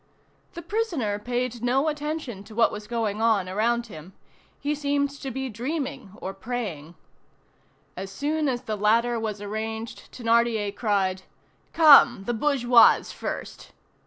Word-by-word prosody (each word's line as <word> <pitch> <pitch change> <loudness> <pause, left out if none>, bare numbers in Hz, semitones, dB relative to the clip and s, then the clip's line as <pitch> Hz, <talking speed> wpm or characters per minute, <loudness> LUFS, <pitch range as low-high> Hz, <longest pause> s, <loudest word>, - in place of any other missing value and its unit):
The 340 - -8
prisoner 330 - -1
paid 245 +1 -3
no 260 +5 +1
attention 300 -8 -4
to 215 - -13
what 230 -1 +4
was 210 0 -8
going 220 -2 -2
on 220 -5 +2
around 230 +5 0
him. 180 -3 -11 0.5
He 290 +1 -1
seemed 285 -1 0
to 280 -1 -7
be 265 +1 -4
dreaming 260 - -4
or 190 - -5
praying. 195 -8 -5 1.0
As 190 +1 -6
soon 295 +6 -1
as 245 -1 -3
the 220 -3 -3
ladder 230 +3 +2
was 210 -2 -4
arranged, 220 +2 -5
Thénardier 230 -3 +1
cried: 195 -4 0 0.5
"Come! 300 -10 +7
the 240 - -2
bourgeoise 245 -2 +4
first!" - - -7
235 Hz, 135 wpm, -25 LUFS, 210-270 Hz, 1.0 s, Come